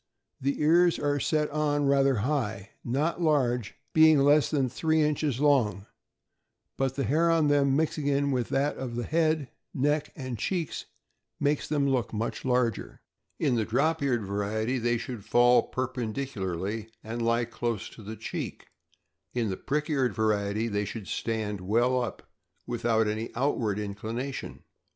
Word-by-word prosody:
— - - -42
The 140 +2 -1
ears 170 +3 +4
are 145 0 0
set 150 +1 0
on 145 -1 +1
rather 140 -1 +4
high, 110 -8 -2
not 150 +8 -1
large, 125 -8 +1 0.2
being 160 -1 +7
less 145 +2 +4
than 140 -4 +1
three 160 +5 0
inches 150 -4 +1
'long; 120 -9 +2 0.9
but 135 -1 -1
the 140 - -1
hair 155 +8 +2
on 160 -3 +3
them, 140 -2 +3
mixing 145 -2 +1
with 125 -3 -1
that 140 +2 0
of 125 -3 -5
the 120 - -2
head, 155 -3 +1 0.2
neck, 145 +3 +1
and 130 -5 -5
cheeks, 170 - -2 0.5
makes 145 0 +1
them 145 -2 +1
look 125 -4 0
much 110 +2 -3
larger. 125 -4 -1 0.3
In 130 - +1
the 115 -2 +1
drop 140 +9 +1
eared 125 -5 +1
variety 110 +5 -1
they 120 0 +1
should 120 -3 -6
fall 120 +3 +5
perpendicularly 110 -5 -3
and 115 +2 -4
lie 115 +1 +2
close 115 -2 -3
to - - -13
the 110 +2 -7
cheek, - - -6 0.7
and 120 - +1
in 110 - -1
the - - -2
prick 150 +2 -2
eared 130 - 0
variety 105 0 0
they 105 -2 -1
should 105 0 -6
stand 110 -3 -2
well 120 +6 +2
up, 120 - -5 0.4
without 115 -2 +1
any 110 +2 -2
outward 115 -5 0
inclination. 110 +6 -5
125 Hz, 155 wpm, -28 LUFS, 110-145 Hz, 0.9 s, being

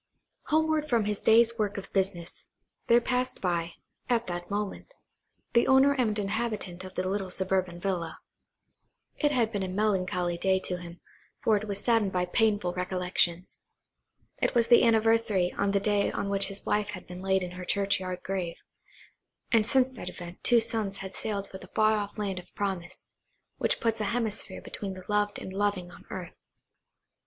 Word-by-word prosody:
Homeward 315 -1 +2
from 230 -4 +2
his 210 -1 -1
day's 230 +1 +4
work 205 -1 0
of 195 - -8
business, 190 -3 -2 0.4
there 235 - +6
passed 250 +1 -1
by, 170 -2 -1 0.4
at 235 -1 +2
that 175 -1 -5
moment, 205 - -4 0.6
the 235 - +4
owner 265 +1 +6
and 235 -6 +1
inhabitant 205 -3 -2
of 185 - -10
the 185 - -1
little 195 0 -2
suburban 185 -2 -1
villa. 175 -3 -2 1.0
It 295 - +3
had 235 -5 +2
been 205 -3 -2
a 190 - -1
melancholy 185 -3 0
day 190 0 +2
to 180 -1 -3
him, 175 0 -10 0.4
for 220 - +4
it 210 +1 -1
was 200 0 0
saddened 225 -5 +2
by 180 -1 0
painful 205 -2 +1
recollections. 180 -1 0 0.8
It - - +1
was 235 -1 +3
the 240 - +8
anniversary 225 -5 +3
of 200 0 +1
the 200 - +2
day 205 0 +1
on 200 - -3
which 195 -1 +2
his 195 0 -7
wife 210 0 +1
had 190 -3 -7
been 180 +1 -9
laid 190 0 +1
in 180 - -5
her 180 0 -7
churchyard 185 -1 -1
grave, 185 -3 -3 1.0
and 225 -3 +4
since 260 -1 +5
that 230 -8 -7
event 175 0 -10
two 240 -1 +5
sons 220 -3 0
had 190 - -7
sailed 200 -2 -2
for 190 - -9
the 185 - -13
far 215 0 +4
off 205 +1 -5
land 195 -3 -2
of 180 - -15
promise, 190 -4 -4 0.5
which - - +1
puts 225 -1 0
a - - 0
hemisphere 225 -1 -2
between 195 -2 -5
the 185 -1 -11
loved 210 -1 +1
and 190 - -7
loving 195 -3 -1
on - - -15
earth. 180 -2 -6
200 Hz, 180 wpm, -28 LUFS, 185-220 Hz, 1.0 s, the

